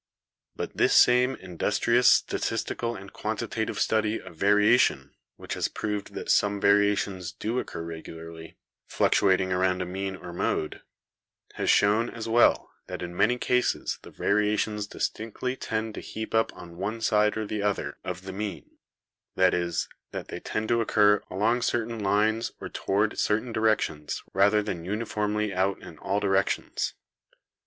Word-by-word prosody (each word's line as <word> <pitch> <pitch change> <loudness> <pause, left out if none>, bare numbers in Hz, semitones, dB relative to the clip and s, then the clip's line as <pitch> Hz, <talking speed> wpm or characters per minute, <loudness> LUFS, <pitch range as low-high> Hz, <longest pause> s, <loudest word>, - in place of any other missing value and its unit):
''But - - -4
this - - +3
same 125 +2 +5
industrious 105 +7 +1
statistical 115 0 +1
and 100 +1 -10
quantitative 110 0 -3
study 110 0 +1
of - - -12
variation 105 - +3 0.2
which - - -6
has - - 0
proved 105 -2 -4
that - - -2
some 100 0 +2
varia 100 +1 +4
tions 95 -3 -4
do 115 +4 -2
occur 85 - -5
regularly, 80 0 -9 0.3
fluctuating 95 -1 +2
around 90 0 +1
a 90 - -2
mean 95 +2 -4
or 90 -2 -9
mode, 80 -2 -2 0.7
has - - -2
shown, 110 +4 +4
as 115 -1 -6
well, 115 +1 +3 0.2
that - - -6
in 90 0 -6
many 115 +7 +3
cases 125 0 0
the - - -12
varia 105 +1 +1
tions 105 -1 -2
distinctly 115 +5 -3
tend 110 -3 -3
to - - -6
heap 110 0 -6
up 110 0 +2
on 85 -1 -11
one 105 +5 -3
side 105 -1 +2
or 110 - -2
the 105 0 -3
other 100 -1 -2
of 90 0 -5
the 95 0 -7
mean; 100 -1 -6 0.6
that 95 0 +4
is, 85 -1 -1 0.2
that - - -7
they - - -5
tend 110 0 -3
to 115 0 +3
occur 105 -2 +4
along 110 +6 +1
cer 120 -2 0
tain 115 0 -6
lines 110 +3 +1
or - - -6
toward 100 +2 0
certain 110 +3 0
directions 110 -9 0
rather 105 +2 +4
than 90 -5 -4
uni 105 +6 -3
formly 105 -1 -1
out 95 +1 0
in - - -12
all 100 +2 -1
directions. 95 -1 0
105 Hz, 160 wpm, -27 LUFS, 95-110 Hz, 0.7 s, same